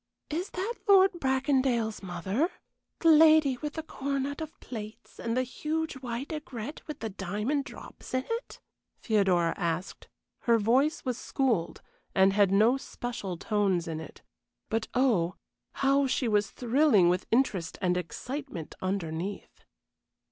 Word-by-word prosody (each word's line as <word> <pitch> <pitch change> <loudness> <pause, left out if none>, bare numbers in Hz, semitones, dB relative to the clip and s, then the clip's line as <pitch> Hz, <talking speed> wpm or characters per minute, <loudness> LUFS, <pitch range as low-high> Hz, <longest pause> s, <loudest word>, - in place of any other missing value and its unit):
"Is 345 +6 -2
that 385 +6 -3
Lord 390 -1 +7
Bracondale's 265 -5 +1
mother 190 - -1 0.5
the 330 - +5
lady 310 -4 +6
with 295 +3 -5
the 320 - -4
coronet 280 0 -3
of 315 -1 -7
plaits 215 -3 -9
and 230 +1 -2
the 255 - +3
huge 310 +5 -3
white 250 +1 -5
aigrette 290 -2 -6
with 300 -2 -7
the 225 - -2
diamond 210 +9 -2
drops 260 - -9
in 255 - 0
it?" 460 +1 -4 0.4
Theodora 185 -6 +2
asked. 170 +2 -3 0.3
Her 235 -1 +3
voice 260 +10 +2
was 250 -2 -2
schooled, 235 -11 -1 0.3
and 190 0 +5
had 200 -1 +4
no 215 +7 +4
special 235 -9 -5
tones 195 -3 0
in 160 -1 -3
it. 160 - -11 0.5
But 225 0 -1
oh, 215 -10 +2 0.4
how 275 0 +2
she 255 -1 0
was 210 -2 +2
thrilling 245 - +3
with 180 +1 +1
interest 215 -8 +1
and 180 -2 +1
excitement 185 - -5
underneath! 185 0 -4
235 Hz, 140 wpm, -29 LUFS, 195-280 Hz, 0.5 s, Lord